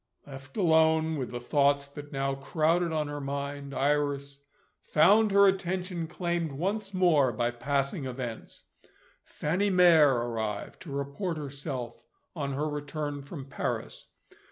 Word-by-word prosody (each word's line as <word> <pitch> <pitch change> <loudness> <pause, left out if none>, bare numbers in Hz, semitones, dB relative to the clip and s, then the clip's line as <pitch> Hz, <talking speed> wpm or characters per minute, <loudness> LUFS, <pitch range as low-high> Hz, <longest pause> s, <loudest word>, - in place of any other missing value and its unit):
Left 135 +1 -11
alone 160 -3 +3
with 130 - -3
the 120 - -5
thoughts 140 +2 +2
that 145 +1 -10
now 135 -1 -1
crowded 160 +5 +1
on 155 -2 -1
her 145 0 -5
mind, 140 0 -4
Iris 140 0 0 0.4
found 210 +8 +4
her 200 0 +6
attention 180 -2 -1
claimed 170 -3 -2
once 195 +7 -2
more 170 -9 +3
by 120 +1 -1
passing 140 +3 -1
events. 125 -3 -6 0.6
Fanny 180 +7 -1
Mere 175 -5 +6
arrived, 115 -4 -3
to 165 - -9
report 140 +6 -3
herself 135 -4 -6 0.3
on 140 -4 -3
her 150 +3 -1
return 145 0 -4
from 140 0 -8
Paris. 135 - -4
145 Hz, 130 wpm, -29 LUFS, 135-170 Hz, 0.6 s, her